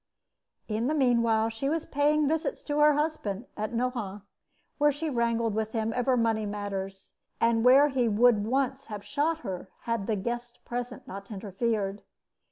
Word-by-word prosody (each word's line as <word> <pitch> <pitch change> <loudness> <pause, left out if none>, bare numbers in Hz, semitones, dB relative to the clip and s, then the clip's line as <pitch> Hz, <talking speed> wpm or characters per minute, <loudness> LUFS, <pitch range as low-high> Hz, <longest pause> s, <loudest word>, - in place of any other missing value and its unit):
In 220 +2 -1
the 305 - +1
meanwhile, 230 -5 +3
she 225 +5 -2
was 325 +1 -1
paying 295 +1 +2
visits 320 +1 -1
to 295 0 -1
her 300 0 +6
husband 290 -9 -2
at 215 +2 -3
Nohant, 230 -5 -2 0.6
where 295 0 +5
she 300 +2 -3
wrangled 230 -2 +1
with 220 0 -2
him 225 -1 -1
over 250 +1 +2
money 225 -2 +1
matters, 195 -2 -5 0.3
and 230 -1 +3
where 270 +4 +7
he 255 -3 +1
would 220 0 +4
once 265 +1 0
have 210 -2 -7
shot 305 +7 0
her 190 - -5
had 230 -4 -2
the 220 - +1
guests 240 +4 -4
present 245 +1 -5
not 195 +1 -8
interfered. 205 0 -2
235 Hz, 165 wpm, -28 LUFS, 210-270 Hz, 0.6 s, where